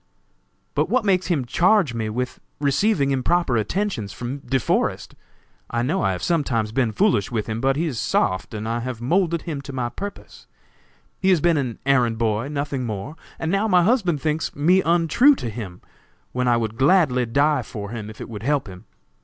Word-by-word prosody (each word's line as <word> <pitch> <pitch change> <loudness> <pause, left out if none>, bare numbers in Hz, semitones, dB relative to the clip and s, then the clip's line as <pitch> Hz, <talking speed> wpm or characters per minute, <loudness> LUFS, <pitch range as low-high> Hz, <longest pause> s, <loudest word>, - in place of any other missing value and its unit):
"But - - 0
what 250 -3 +1
makes 185 -3 +2
him 155 -8 0
charge 180 - +3
me 110 -2 -2
with 125 +3 -3 0.2
receiving 145 +1 +2
improper 135 +1 +1
attentions 120 - -1
from 125 +6 -5
De 135 0 -1
Forest? - - -1 0.6
I 120 0 -1
know 155 +10 0
I 95 - +2
have 90 - -6
sometimes 125 -10 0
been 120 -1 +1
foolish 185 - +2
with 110 -3 -1
him, 110 0 -4
but 135 0 +2
he 160 +4 0
is 135 -9 -3
soft 95 +4 0
and 110 +1 -4
I 115 +1 -1
have 120 -1 -5
moulded 170 +6 +1
him 155 -5 -4
to 140 - -8
my 125 -2 -2
purpose. 200 +9 -9 0.7
He 190 - +2
has 185 -3 +5
been 170 +2 +3
my 130 -6 -2
errand 120 -4 +2
boy, 110 +2 0
nothing 140 -2 -3
more; 110 +6 -5 0.2
and 160 - -2
now 200 +3 +1
my 180 -4 +4
husband 185 - +2
thinks 155 +2 -2
me 175 +6 +4
untrue 175 - +4
to 120 - -5
him, 100 -6 -7 0.5
when 125 0 -1
I 120 -1 +4
would 110 -1 -3
gladly 135 -5 +3
die 145 +3 +2
for 105 -2 -7
him, 110 -3 -6
if 110 - -12
it - - -6
would 105 -3 -7
help 140 +3 0
him. 95 +3 -11
135 Hz, 195 wpm, -22 LUFS, 115-170 Hz, 0.7 s, has